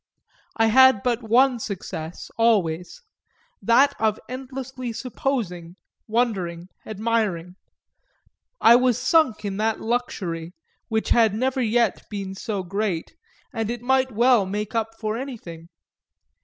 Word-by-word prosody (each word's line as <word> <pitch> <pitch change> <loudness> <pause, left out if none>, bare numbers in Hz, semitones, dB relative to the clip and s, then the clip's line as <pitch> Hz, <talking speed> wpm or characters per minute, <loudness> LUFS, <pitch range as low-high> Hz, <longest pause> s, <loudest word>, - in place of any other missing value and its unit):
I 225 - +4
had 260 -1 +6
but 245 -1 0
one 245 +3 +3
success, 175 -6 -6
always 200 - +1 0.6
that 275 +5 +4
of 220 -1 +1
endlessly 255 -1 -6
supposing, 220 -9 -3 0.3
wondering, 190 -7 -1 0.2
admiring: 215 -5 -1 1.1
I 235 +1 +7
was 250 -2 +2
sunk 255 -6 +2
in 195 -1 -3
that 220 +1 0
luxury, 180 -8 -3 0.3
which 220 -1 -1
had 225 -3 +4
never 260 +3 0
yet 230 -2 +1
been 195 -2 -5
so 200 0 -4
great, 195 - -3 0.4
and 225 -2 -2
it 240 0 -4
might 260 +1 +2
well 235 -2 +3
make 210 +2 -4
up 225 -1 -2
for 215 0 -2
anything. 185 -12 -8
225 Hz, 120 wpm, -23 LUFS, 195-245 Hz, 1.1 s, I